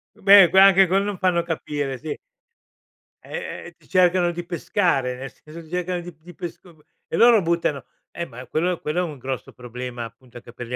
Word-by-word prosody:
Beh, 195 -2 +7
qua 190 - +6
anche 195 0 +6
quel 190 +2 +2
non 205 -2 -3
fanno 180 -2 +1
capire, 145 -5 -4
sì. 150 +4 -5 1.1
Eh 475 -1 -6
eh, - - -14
ti - - -25
cercano 180 -1 +3
di 175 0 -6
pescare, 170 - 0
nel 130 0 -8
senso 155 +2 -13
ti 155 - -17
cercano 180 0 -2
di 175 - -9
p 160 - -29
di 175 0 -14
pesc 175 -2 -7
uhm, 160 -3 -18 0.3
e - - -4
loro 230 -1 +6
buttano 165 -4 -1 0.3
Eh, 170 - -5
ma 125 -3 -11
quello 175 +5 -1
quello 155 +4 -2
è - - +2
un 145 - -9
grosso 130 0 -6
problema, 125 0 -7
appunto, 120 +2 -13
anche 120 - -13
per 120 0 -9
gli 125 - -4
170 Hz, 210 wpm, -23 LUFS, 135-180 Hz, 1.1 s, Beh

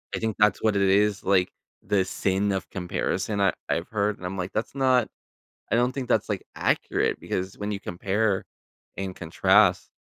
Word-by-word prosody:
I - - -2
think 110 -2 -2
that's 105 -1 +3
what 110 -2 +2
it 100 - +2
is, 100 +1 +3
like, 95 -2 +3 0.4
the 100 -2 +2
sin 95 +2 0
of 95 - -4
comparison 95 +2 -2
I 100 -2 +3 0.2
I've 85 +1 -1
heard. 105 -1 0
And 90 - -9
I'm 95 +2 -4
like, 90 0 -3
that's 110 - -2
not 130 -3 +3 0.6
I - - +3
don't 125 +2 +2
think 130 -3 -5
that's, - - +2
like, - - -3
accurate - - 0
because 95 +1 -4
when 105 0 -3
you 100 - -3
compare 100 +2 -1 0.5
and 95 -1 -4
contrast, 80 -2 +3
100 Hz, 185 wpm, -26 LUFS, 95-105 Hz, 0.6 s, that's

